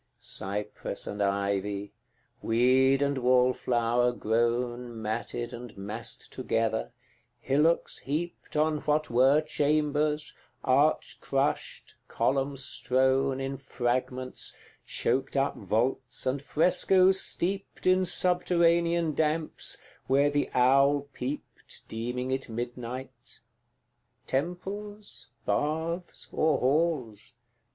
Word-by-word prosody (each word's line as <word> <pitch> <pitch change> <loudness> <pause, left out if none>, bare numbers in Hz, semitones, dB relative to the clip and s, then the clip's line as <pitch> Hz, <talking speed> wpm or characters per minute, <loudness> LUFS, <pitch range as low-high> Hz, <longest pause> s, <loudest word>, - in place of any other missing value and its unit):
CVII. - - -33
Cypress 100 +2 -5
and 105 0 -4
ivy, 100 0 -1 0.5
weed 130 +4 +3
and 140 -1 0
wallflower 125 -1 +2
grown 120 +1 -1
Matted 115 +2 -3
and 120 -3 -9
massed 105 +3 -6
together, 115 -1 -1 0.5
hillocks 150 +7 +1
heaped 155 +5 -4
On 155 0 +2
what 150 -1 0
were 135 +5 +5
chambers, 150 0 0 0.3
arch 140 +4 +2
crushed, 135 +1 -2
column 135 +1 0
strown 130 +1 +1
In 135 0 -3
fragments, 130 0 -3 0.3
choked 130 +3 -1
up 135 +1 +1
vaults, 120 +6 -1
and 130 +1 0
frescoes 185 +5 +4
steeped 195 +3 -2
In 185 0 +4
subterranean 170 -2 +3
damps, 155 +1 0 0.3
where 140 +2 +3
the 145 0 0
owl 140 +3 +4
peeped, 135 +4 -7
Deeming 125 +3 -3
it 130 -1 -2
midnight: 120 +2 -7 0.8
Temples, 195 +3 -4 0.2
baths, 160 +4 -2
or 155 0 +2
halls? 130 -6 0
135 Hz, 95 wpm, -28 LUFS, 120-155 Hz, 0.8 s, were